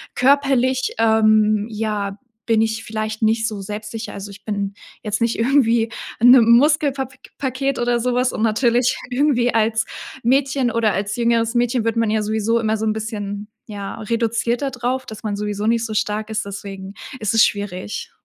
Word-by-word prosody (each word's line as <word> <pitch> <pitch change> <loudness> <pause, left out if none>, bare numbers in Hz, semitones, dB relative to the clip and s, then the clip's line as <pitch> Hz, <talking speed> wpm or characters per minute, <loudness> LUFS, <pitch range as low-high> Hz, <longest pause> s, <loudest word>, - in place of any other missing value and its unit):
Körperlich, 260 -1 +2
ähm, 215 -1 +3
ja, 210 -2 -3 0.3
bin 225 -2 +3
ich 220 0 -1
vielleicht 215 0 -4
nicht 220 0 +2
so 210 -3 -5
selbstsicher. 215 +3 -6
Also, 200 0 -7
ich 200 0 -14
bin 200 -2 -2 0.3
jetzt 215 0 -2
nicht 230 0 +1
irgendwie 230 -2 +3 0.3
'n, 245 +2 +8
ähm, 235 -3 +6
Muskelpap 280 -2 +1 0.2
paket 270 0 -1
oder 240 0 +1
so 250 +1 0
was 250 0 +1
und - - -3
natürlich 235 +2 +2
irgendwie 245 -2 +2
als 220 0 +1 0.4
Mädchen, 265 0 +2
oder 225 -2 +1
als 205 +2 -2
jüngeres 230 -1 +1
Mädchen 240 0 +1
wird 230 - 0
man 230 -1 +2
ja 215 0 +1
sowieso 220 +2 0
immer 220 -1 0
so 220 - -2
'n 215 - +2
bisschen, 210 -2 -5 0.2
ja, 200 -2 -6
reduziert 230 +2 -1
da 280 - 0
drauf, 255 +1 -2
dass 220 +1 -9
man 210 -2 -2
sowieso 210 0 -3
nicht 230 0 +2
so 220 - -5
stark 215 +1 -1
ist, 220 0 -2
deswegen 195 -1 -7 0.3
ist 215 0 -1
es 225 0 +6
schwierig. 190 - -4
225 Hz, 180 wpm, -20 LUFS, 215-245 Hz, 0.4 s, n